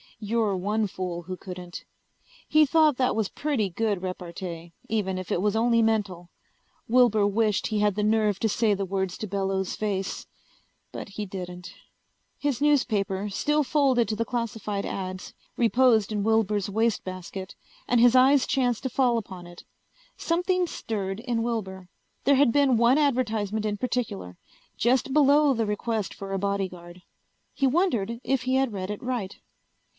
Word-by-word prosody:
You're 215 -1 0
one 210 +4 0
fool 180 -2 -5
who 185 +2 -6
couldn't. 180 -2 -8 0.6
He 310 0 +5
thought 305 -2 +3
that 255 -1 +1
was 220 -3 0
pretty 275 -10 -1
good 205 +1 -1
repartee, 175 -2 -6 0.2
even 195 -4 -1
if 185 -1 -6
it 175 - +1
was 210 +1 +1
only 230 +1 +3
mental. 200 -6 -1 0.6
Wilbur 230 -3 +4
wished 210 0 +1
he 215 -2 -1
had 205 -2 +2
the 210 - -1
nerve 210 -2 +2
to 220 - +2
say 215 0 +2
the 195 0 -2
words 190 -1 -2
to 215 - -4
Bellows' 195 -1 -2
face. 195 -3 -3 0.6
But - - -7
he 210 +1 -5
didn't. 180 -2 -8 0.6
His 285 -3 -2
newspaper, 210 -9 +1
still 295 +9 +1
folded 265 -4 +2
to 215 - -1
the 230 +2 -1
classified 225 -4 -3
ads, 185 -1 -5 0.2
reposed 235 -3 +3
in 205 -1 -1
Wilbur's 210 -2 +1
wastebasket 190 -3 -3 0.3
and 245 - +3
his 245 +1 +6
eyes 265 +1 +5
chanced 250 -3 0
to 260 - -1
fall 245 -1 +2
upon 185 -4 -10
it. 175 0 -13 0.5
Something 360 +2 0
stirred 200 - -4
in 235 -1 -2
Wilbur. 190 -6 -4 0.4
There 280 - +5
had 270 -2 +4
been 275 -2 +3
one 240 +4 +4
advertisement 220 -7 0
in 205 -1 -1
particular. 205 - -3 0.4
Just 255 +2 +1
below 290 0 +5
the 230 -2 0
request 210 0 -2
for 195 0 -8
a 195 - -1
bodyguard. 185 -3 -4 0.5
He 275 - +1
wondered 240 - 0
if 270 -1 0
he 255 +1 0
had 265 -4 +1
read 190 -1 -4
it 210 - -6
right. 240 -6 -3
215 Hz, 160 wpm, -26 LUFS, 195-245 Hz, 0.6 s, his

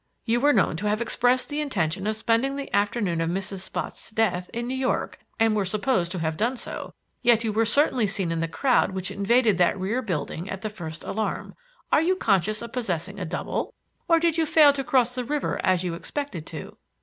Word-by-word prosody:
You 235 +1 +2
were 290 +3 +4
known 165 - +2
to 210 +5 -2
have 210 +1 +1
expressed 245 +2 +2
the 295 +1 -2
intention 190 - -1
of 215 - 0
spending 230 +5 +1
the 280 0 -4
afternoon 200 -4 +1
of 165 - 0
Mrs. 195 +2 -2
Spotts' 190 - -5
death 215 -5 0
in 235 +1 -3
New 255 - -2
York 260 0 -1 0.2
and 225 -1 +3
were 205 - +1
supposed 195 -2 0
to - - -3
have 160 -2 -1
done 240 +4 0
so, - - -6 0.3
yet 235 -1 +4
you 220 -2 -1
were 225 +1 +2
certainly 250 -2 +3
seen 195 -4 -1
in 165 - -1
the 165 - 0
crowd 245 +2 +2
which 190 0 -3
invaded 215 0 +2
that 180 +2 +3
rear 210 +7 -1
building 175 - -3
at 190 +2 -6
the 215 - -3
first 165 -5 -7
alarm. 215 +1 -3 0.4
Are - - +5
you 360 +3 +2
conscious 215 - +1
of 235 - -8
possessing 195 -5 -3
a 185 - -3
double, 160 - -3 0.3
or 335 -1 +5
did 335 0 +1
you 320 - +2
fail 300 -2 +6
to 275 -1 -3
cross 255 -4 +2
the 250 0 -2
river 290 +4 -2
as 185 -1 +2
you 175 -2 -2
expected 180 - -5
to?" - - -8
215 Hz, 220 wpm, -25 LUFS, 185-255 Hz, 0.4 s, fail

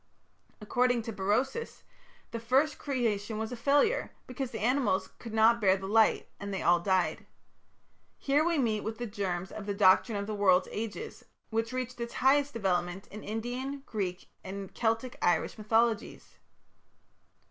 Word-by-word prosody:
According 245 +2 +1
to 225 - -5
Berosus 215 - -1 0.5
the 230 - -4
first 265 +6 +2
creation 225 -6 -1
was 220 +1 -3
a - - -3
failure, 290 - +2 0.2
because 255 0 -4
the 235 - -6
animals 245 -3 +1
could 230 - -8
not 225 +2 +4
bear 190 -1 +4
the 190 - -7
light 220 +2 +3
and 200 0 -5
they 195 - -3
all 175 0 +5
died. 185 0 0 0.9
Here 285 +2 +2
we 340 0 +1
meet 220 -6 +1
with 220 0 -4
the 240 - -4
germs 190 -4 -3
of 210 -1 -7
the 200 - -1
Doctrine 200 +3 +4
of 200 - -3
the 215 - -4
World's 190 -3 +3
Ages, 225 - -6 0.3
which 225 +1 -1
reached 255 -1 -4
its 235 - -5
highest 280 +2 +3
development 185 -4 -1
in 210 +1 -9
Indian, 250 +6 -4
Greek, 185 -4 -4 0.2
and 195 0 -7
Celtic 230 +2 -1
(Irish) 175 - +1
mythologies. 225 0 0
225 Hz, 160 wpm, -30 LUFS, 200-250 Hz, 0.9 s, all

